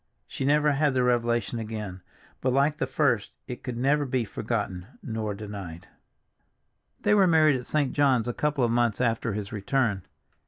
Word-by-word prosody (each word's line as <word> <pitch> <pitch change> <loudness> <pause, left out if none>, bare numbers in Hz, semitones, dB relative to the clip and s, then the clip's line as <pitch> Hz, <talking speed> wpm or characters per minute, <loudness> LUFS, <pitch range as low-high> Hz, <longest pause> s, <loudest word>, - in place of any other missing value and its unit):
She 135 - -4
never 150 +1 +3
had 145 -1 +1
the 125 - +3
revelation 120 -2 +1
again, 105 -4 -6 0.4
but 130 - +1
like 140 +3 +2
the - - -1
first 120 -9 +1
it 125 -2 -7
could 125 -3 -5
never 140 +4 +2
be 130 -3 -1
forgotten 100 -4 -3 0.2
nor 110 -3 -3
denied. 100 -5 -8
III - - -38
THEY - - +3
were 200 -3 +5
married 155 -5 +4
at 125 - -11
St. 145 -4 0
John's 130 -5 +3
a 120 - -1
couple 150 -1 0
of 120 - +2
months 120 -2 +1
after 115 -2 0
his 105 +1 -5
return. 110 -1 0
120 Hz, 180 wpm, -27 LUFS, 105-140 Hz, 0.4 s, were